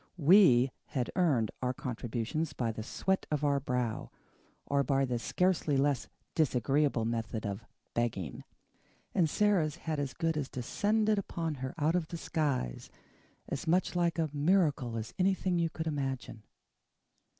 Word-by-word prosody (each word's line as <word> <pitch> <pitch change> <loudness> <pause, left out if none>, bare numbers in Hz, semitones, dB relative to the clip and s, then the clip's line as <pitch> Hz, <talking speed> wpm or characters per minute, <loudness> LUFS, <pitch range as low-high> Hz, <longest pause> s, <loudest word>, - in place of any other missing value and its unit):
WE 145 -7 +6
had 130 -5 -2
earned 140 - +2
our 125 0 -1
contributions 125 +5 -3
by 120 -4 -1
the 110 - -6
sweat 190 - -1
of 150 -1 -1
our 140 -1 +3
brow, 125 -4 -2 0.6
or 140 0 +2
by 135 +1 +2
the 125 -2 -1
scarcely 170 +1 +1
less 140 -2 +1 0.3
disagreeable 135 -3 +2
method 115 -1 -2
of 100 +2 -4 0.3
"begging." 100 - -2 0.7
And 170 -4 +3
Sara's 180 -6 +2
had 160 -3 -3
as 140 -3 -3
good 165 -2 0
as 145 -3 -2
descended 210 - +1
upon 165 -4 -3
her 130 +4 -4
out 155 +1 +2
of 175 -3 0
the 170 - -5
skies, 140 - -2 0.6
as 140 - -4
much 180 +2 +2
like 175 -1 +1
a 160 -3 0
miracle 145 -7 +2
as 110 +1 -5
anything 185 -1 +2
you 165 -1 +1
could 160 0 -5
imagine. 135 -7 -3
145 Hz, 150 wpm, -31 LUFS, 125-165 Hz, 0.7 s, WE